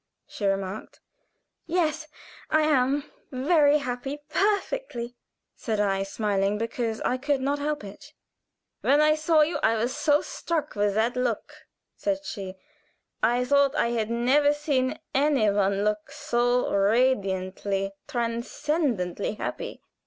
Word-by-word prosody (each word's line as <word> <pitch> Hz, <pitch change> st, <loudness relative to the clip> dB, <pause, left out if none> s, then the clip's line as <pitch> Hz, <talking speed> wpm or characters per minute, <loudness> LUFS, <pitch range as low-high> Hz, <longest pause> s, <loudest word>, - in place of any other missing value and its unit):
she 205 Hz, -, -3 dB
remarked. 195 Hz, +1 st, -3 dB, 0.7 s
"Yes, 315 Hz, -2 st, 0 dB, 0.4 s
I 310 Hz, -, +3 dB
am 280 Hz, -1 st, +2 dB, 0.3 s
very 290 Hz, +2 st, +4 dB
happy 270 Hz, +1 st, -4 dB
perfectly," 405 Hz, -, -1 dB, 0.4 s
said 220 Hz, -4 st, -2 dB
I, 195 Hz, -2 st, +1 dB
smiling, 200 Hz, 0 st, 0 dB
because 230 Hz, 0 st, -2 dB
I 255 Hz, -, 0 dB
could 285 Hz, +1 st, 0 dB
not 280 Hz, +2 st, -1 dB
help 295 Hz, -3 st, -2 dB
it. 245 Hz, +9 st, -11 dB, 0.7 s
"When 285 Hz, +2 st, +3 dB
I 305 Hz, 0 st, +5 dB
saw 310 Hz, 0 st, +3 dB
you 315 Hz, +3 st, +1 dB
I 225 Hz, -, +3 dB
was 235 Hz, +4 st, -1 dB
so 295 Hz, 0 st, +3 dB
struck 320 Hz, -3 st, -3 dB
with 205 Hz, -1 st, 0 dB
that 230 Hz, +3 st, +1 dB
look," 250 Hz, -3 st, -2 dB, 0.4 s
said 295 Hz, -1 st, -2 dB
she. 190 Hz, -6 st, -6 dB, 0.7 s
"I 245 Hz, +1 st, +2 dB
thought 280 Hz, +1 st, +3 dB
I 235 Hz, -, +2 dB
had 225 Hz, -2 st, -1 dB
never 270 Hz, +5 st, +3 dB
seen 280 Hz, -4 st, 0 dB, 0.2 s
any 270 Hz, -6 st, +3 dB
one 200 Hz, 0 st, +1 dB
look 210 Hz, +2 st, -1 dB
so 250 Hz, -4 st, +1 dB
radiantly, 195 Hz, -3 st, +1 dB, 0.2 s
transcendently 235 Hz, -, -1 dB
happy. -, -, -5 dB
250 Hz, 130 wpm, -26 LUFS, 210-295 Hz, 0.7 s, I